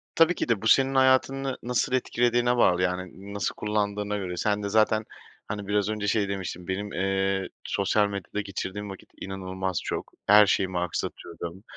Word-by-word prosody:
Tabii 165 Hz, +2 st, +5 dB
ki -, -, -3 dB
de. 110 Hz, -4 st, +2 dB
Bu 110 Hz, -, -1 dB
senin 135 Hz, +2 st, +4 dB
hayatını 130 Hz, 0 st, +3 dB
nasıl 125 Hz, +1 st, 0 dB
etkilediğine 120 Hz, -1 st, +2 dB
bağlı. 90 Hz, -5 st, +4 dB
Yani, 90 Hz, +2 st, -3 dB
nasıl 100 Hz, -2 st, -2 dB
kullandığına 105 Hz, -1 st, -1 dB
göre 90 Hz, -3 st, -4 dB
sen 105 Hz, +1 st, 0 dB
de 100 Hz, -, -2 dB
zaten, 110 Hz, 0 st, +3 dB, 0.4 s
hani, 100 Hz, -2 st, -5 dB
biraz 105 Hz, 0 st, +1 dB
önce 105 Hz, -1 st, -2 dB
şey 100 Hz, -1 st, +1 dB
demiştin. 95 Hz, -2 st, -5 dB
"Benim, 100 Hz, +2 st, -3 dB
eee, 95 Hz, +1 st, 0 dB
sosyal 100 Hz, +1 st, +1 dB
medyada 100 Hz, +1 st, -4 dB
geçirdiğim 100 Hz, +1 st, -5 dB
vakit 95 Hz, -, -10 dB
inanılmaz 95 Hz, -1 st, -3 dB
çok. -, -, -4 dB, 0.2 s
Her 105 Hz, +1 st, +8 dB
şeyimi 95 Hz, -2 st, +1 dB
aksatıyordum. 85 Hz, +1 st, -5 dB
100 Hz, 165 wpm, -26 LUFS, 95-110 Hz, 0.4 s, Her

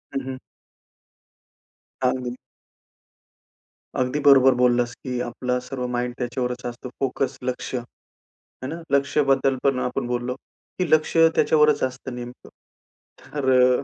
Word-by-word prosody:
हं, 135 Hz, -, 0 dB
हं. 130 Hz, -1 st, -5 dB, 1.7 s
अगदी. 125 Hz, -1 st, -2 dB, 1.6 s
अगदी 130 Hz, +3 st, 0 dB
बरोबर 135 Hz, -2 st, +7 dB
बोललास 125 Hz, -1 st, +2 dB
की 125 Hz, -1 st, -3 dB
आपला 125 Hz, +1 st, -2 dB
सर्व 125 Hz, -1 st, -4 dB
माईंड 125 Hz, 0 st, -2 dB
त्याच्यावरच 125 Hz, 0 st, -3 dB
असतो. 120 Hz, +1 st, -6 dB
फोकस, 135 Hz, 0 st, -1 dB
लक्ष, 125 Hz, +1 st, -3 dB
आहे 120 Hz, -1 st, -8 dB, 0.6 s
ना? 165 Hz, +4 st, -6 dB
लक्ष्याबद्दल 135 Hz, -1 st, +2 dB
पण 135 Hz, -2 st, +2 dB
आपण 125 Hz, 0 st, -2 dB
बोललो 120 Hz, +1 st, -2 dB, 0.4 s
की 180 Hz, -3 st, 0 dB
लक्ष 155 Hz, +1 st, +3 dB, 0.2 s
त्याच्यावरच 150 Hz, -1 st, +4 dB
असतं 130 Hz, -1 st, -4 dB
नेमकं. 125 Hz, 0 st, -9 dB, 0.7 s
तर 140 Hz, -3 st, -3 dB, 0.3 s
अ, -, -, -5 dB
125 Hz, 115 wpm, -23 LUFS, 125-135 Hz, 1.7 s, बरोबर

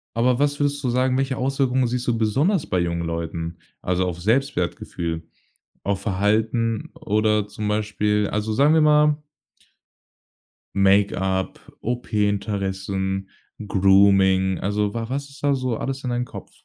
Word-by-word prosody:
Aber 120 Hz, +2 st, +2 dB
was 145 Hz, 0 st, +1 dB
würdest 145 Hz, 0 st, 0 dB
du 125 Hz, -, 0 dB
sagen, 130 Hz, +1 st, +1 dB
welche 135 Hz, -1 st, -1 dB
Auswirkungen 130 Hz, -1 st, +1 dB
siehst 125 Hz, +1 st, -3 dB
du 120 Hz, -2 st, +1 dB
besonders 140 Hz, -, +1 dB
bei 90 Hz, -, 0 dB
jungen 85 Hz, -1 st, -1 dB
Leuten, 85 Hz, 0 st, -4 dB, 0.2 s
also, 90 Hz, 0 st, 0 dB
auf's 90 Hz, 0 st, -5 dB
Selbstwertgefühl, 90 Hz, -, -1 dB, 0.6 s
auf 100 Hz, -1 st, -1 dB
Verhalten 110 Hz, +3 st, 0 dB
oder 105 Hz, -1 st, +1 dB
zum 105 Hz, 0 st, -5 dB
Beispiel 105 Hz, 0 st, 0 dB
also, 105 Hz, +1 st, -1 dB
sagen 145 Hz, +6 st, +4 dB
wir 160 Hz, -, +4 dB
mal 150 Hz, 0 st, +4 dB, 1.5 s
Make-up, 95 Hz, -1 st, +2 dB, 0.2 s
OP-Interessen, 100 Hz, -4 st, -2 dB, 0.4 s
Grooming. 95 Hz, -1 st, +4 dB
Also, 105 Hz, +1 st, -1 dB
wa 115 Hz, -1 st, -4 dB
was 140 Hz, +2 st, -3 dB
ist 140 Hz, +1 st, -15 dB
da 140 Hz, -1 st, +3 dB
so 130 Hz, -3 st, -2 dB
alles 135 Hz, 0 st, -4 dB
in 125 Hz, -, -2 dB
dein 120 Hz, 0 st, -1 dB
Kopf? -, -, -10 dB
105 Hz, 135 wpm, -23 LUFS, 95-130 Hz, 1.5 s, sagen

